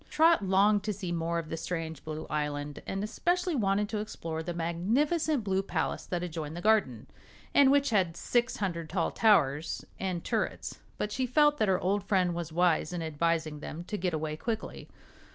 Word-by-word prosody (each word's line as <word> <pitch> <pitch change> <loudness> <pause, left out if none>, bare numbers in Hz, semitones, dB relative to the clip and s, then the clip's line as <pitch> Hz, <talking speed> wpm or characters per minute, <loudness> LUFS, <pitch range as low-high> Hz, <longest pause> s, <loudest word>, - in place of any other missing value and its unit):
Trot 325 -6 +4
longed 200 +2 +4
to 210 - 0
see 185 -3 -5
more 170 0 -1
of 165 -2 -4
the 165 - -3
strange 160 -2 -4
blue 155 0 -5
island, 145 -1 -3
and 195 +1 -2
especially 350 - 0
wanted 205 -5 +1
to 215 - -2
explore 165 -6 -4
the 170 +2 -4
magnificent 230 - 0
blue 190 -1 +1
palace 195 - -2
that 175 -1 -2
adjoined 160 -2 -5
the - - -3
garden, 195 - +2 0.5
and 280 -2 +6
which 280 -1 +3
had 180 -6 +1
six 240 0 0
hundred 170 -5 -3
tall 170 -1 0
towers 155 -8 +2
and 185 -3 -2
turrets; - - -2 0.2
but 210 - -2
she 255 +3 -1
felt 295 +3 +4
that 215 - +3
her 185 -1 +3
old 200 +1 0
friend 185 -3 +2
was 170 -1 -4
wise 170 -1 +2
in 175 -2 -3
advising 160 -1 -1
them 160 +3 -6
to 210 - -5
get 180 -2 -1
away 155 -1 -2
quickly. 220 +7 -5
180 Hz, 190 wpm, -30 LUFS, 165-215 Hz, 0.5 s, and